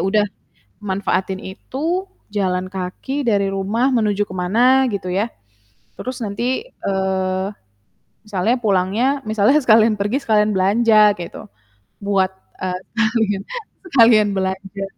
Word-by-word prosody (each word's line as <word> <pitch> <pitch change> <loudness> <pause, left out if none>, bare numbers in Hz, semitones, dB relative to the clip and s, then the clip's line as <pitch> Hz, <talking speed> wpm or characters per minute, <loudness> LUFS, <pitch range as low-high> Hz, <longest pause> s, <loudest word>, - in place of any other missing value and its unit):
udah 210 +1 +3 0.6
manfaatin 190 -1 -1
itu, 320 - -3 0.2
jalan 185 -3 -1
kaki 195 +10 -4
dari 200 -2 +2
rumah 210 +7 0
menuju 210 -3 +1
ke 185 - -8
mana 240 +9 +3
gitu 195 -2 -4
ya, 200 +4 +1 0.7
terus 255 0 -5
nanti, 240 - -2 0.2
eee, 190 -1 0 0.8
misalnya 210 +3 0
pulangnya 200 +2 +1 0.3
misalnya 215 +6 +3
sekalian 220 -1 +5
pergi 205 +7 0
sekalian 210 -1 +3
belanja 210 +2 +5
gitu, 170 - -7 0.6
buat, 195 -2 +2 0.3
eee, 180 -1 -2
sekalian 220 -3 0 0.5
sekalian 225 -5 +6
belanja. 190 +1 -3
205 Hz, 110 wpm, -20 LUFS, 190-230 Hz, 0.8 s, sekalian